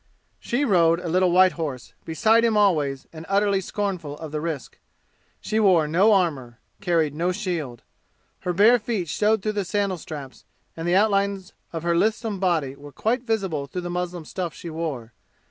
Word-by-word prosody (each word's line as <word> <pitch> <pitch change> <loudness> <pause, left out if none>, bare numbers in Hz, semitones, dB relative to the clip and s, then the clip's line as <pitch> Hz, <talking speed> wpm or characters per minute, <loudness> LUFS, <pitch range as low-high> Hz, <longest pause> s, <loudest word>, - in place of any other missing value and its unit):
She 260 +5 -1
rode 170 -7 +4
a 180 - -6
little 180 +2 +2
white 185 +1 +6
horse, 145 -8 -5
beside 220 +8 +3
him 225 -2 +2
always 150 -10 +2
and 160 0 -8
utterly 200 0 +2
scornful 180 -7 -4
of 160 -1 -8
the 150 0 -3
risk. 160 -5 -5 0.6
She 215 0 -1
wore 180 -7 +4
no 185 +8 +4
armor 140 -11 0 0.2
carried 165 -6 +1
no 170 +4 0
shield. 175 - -4 0.6
Her 180 - -2
bare 215 +7 +5
feet 210 -7 -3
showed 210 +6 +1
through 215 - 0
the 205 -1 -2
sandal 195 -1 -1
straps, 145 -4 -9 0.3
and 165 +1 -5
the 175 - +3
outlines 200 -2 +1 0.2
of 165 -1 -5
her 170 0 +1
lissom 215 +2 0
body 165 -8 0
were 145 +1 -12
quite 235 - -1
visible 195 - -2
through 180 +6 -5
the 175 0 -5
muslin 175 -2 -4
stuff 175 -1 -4
she 170 - -8
wore. 145 -8 -5
180 Hz, 180 wpm, -24 LUFS, 160-205 Hz, 0.6 s, white